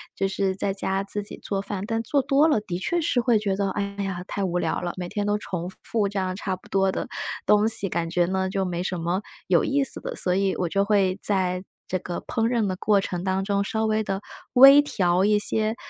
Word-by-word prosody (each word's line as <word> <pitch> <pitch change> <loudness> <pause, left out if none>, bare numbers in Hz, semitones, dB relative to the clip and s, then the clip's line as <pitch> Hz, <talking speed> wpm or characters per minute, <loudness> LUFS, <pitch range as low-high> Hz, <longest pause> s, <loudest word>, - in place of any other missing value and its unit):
就 195 - 0
是 195 0 -1
在 195 +1 -1
家 195 0 0
自 205 +1 -4
己 - - -9
做 195 -1 -3
饭。 195 -1 -5
但 225 -1 -1
做 280 +4 +1
多 280 +3 +3
了， 265 -9 +2
的 180 -4 -4
确 340 - -1
是 300 -6 +1
会 240 -2 +3
觉 200 -2 -1
得， 195 0 -1
哎 205 - -2 0.2
呀 185 -2 -4
太 200 - -3
无 180 -2 -1
聊 - - -1
了， 175 -1 -4
每 180 -1 -5
天 205 +1 -2
都 205 0 +1
重 180 -4 -5
复 220 -3 0
都 - - 0
这 200 0 -3
样 185 -1 -2
差 190 -1 -3
不 185 - -19
多 195 -1 +2
的 - - -4 0.4
东 210 +1 +4
西， 220 -3 +4
感 165 -1 -2
觉 175 +1 +2
呢 190 0 -1
就 195 0 -1
没 175 -1 -3
什 180 -1 -3
么， 175 +4 -1 0.3
有 175 -2 +3
意 280 0 +1
思 - - -1
的。 - - -6
所 180 - 0
以 195 0 +1
我 175 - -2
就 195 +3 +1
会 200 -3 +2
在 185 -2 +1 0.2
这 185 - -1
个 175 0 -5
烹 225 -1 0
饪 235 -2 +1
的 185 - -2
过 205 +2 +2
程 180 -2 -4
当 190 0 0
中 200 0 0
稍 220 +2 -1
微 220 0 +1
地 195 -1 -3 0.3
微 275 +3 +9
调 180 -9 +1
一 210 0 +3
些， 215 +2 0
195 Hz, 270 characters per minute, -24 LUFS, 185-215 Hz, 0.4 s, 微